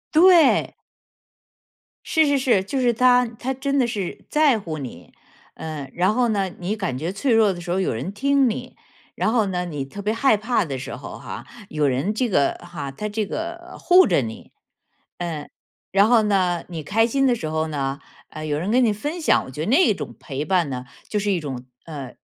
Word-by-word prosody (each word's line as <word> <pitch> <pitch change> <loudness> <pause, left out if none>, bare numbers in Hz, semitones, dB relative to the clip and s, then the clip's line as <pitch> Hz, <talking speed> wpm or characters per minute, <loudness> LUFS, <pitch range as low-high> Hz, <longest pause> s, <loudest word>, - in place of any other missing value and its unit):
对。 340 -3 +6 1.3
是 315 -2 +3
是 285 -1 +3
是， 240 -8 +2
就 265 +7 -3
是 245 -1 +4
他 250 +1 +4
他 240 +3 -4
真 275 +1 -1
的 245 - +3
是 200 -6 -5
在 295 -7 +3
乎 160 -5 -5
你。 120 - -9 0.4
呃， 150 -4 -6
然 185 +4 +2
后 245 0 +2
呢， 195 -3 0
你 190 +5 -2
感 185 - -3
觉 165 +6 -3
脆 245 +6 0
弱 220 -4 +4
的 175 - -8
时 175 0 -5
候 190 - +1
有 185 - 0
人 165 - -4
听 275 +2 +2
你。 - - -6 0.4
然 215 - +1
后 225 -3 +2
呢， 180 -2 -2
你 145 -5 -4
特 200 +9 -8
别 210 +2 0
害 230 0 +3
怕 215 -2 0
的 135 -3 -4
时 - - -6
候 - - -9
哈， - - -8 0.2
有 150 -2 +1
人 135 +11 0
这 250 +1 +1
个 145 -9 +2
哈 145 -5 -6
他 210 +10 -5
这 210 0 -2
个 340 - -6
护 365 +1 +6
着 - - +3
你。 110 -1 -7 0.7
嗯， 160 -4 -4 0.4
然 200 +3 +4
后 230 -3 +5
呢， 185 -4 +1
你 165 -4 -6
开 225 +8 +2
心 270 +3 +1
的 245 - +3
时 160 -8 -5
候 160 0 -1
呢， 140 -1 -3 0.3
呃， 155 0 -7
有 150 -1 -1
人 190 +6 -2
跟 250 +1 +4
你 220 - +3
分 295 - -4
享。 - - +3
我 130 - -10
觉 150 - -6
得 - - -5
那 280 - +5
种 - - -7
陪 140 -1 -4
伴 175 -4 +1
呢， 125 -1 -5 0.2
就 210 - -1
是 205 0 0
一 180 - +1
种， 135 -5 -6 0.2
呃， 140 -6 -8
200 Hz, 225 characters per minute, -22 LUFS, 155-245 Hz, 1.3 s, 对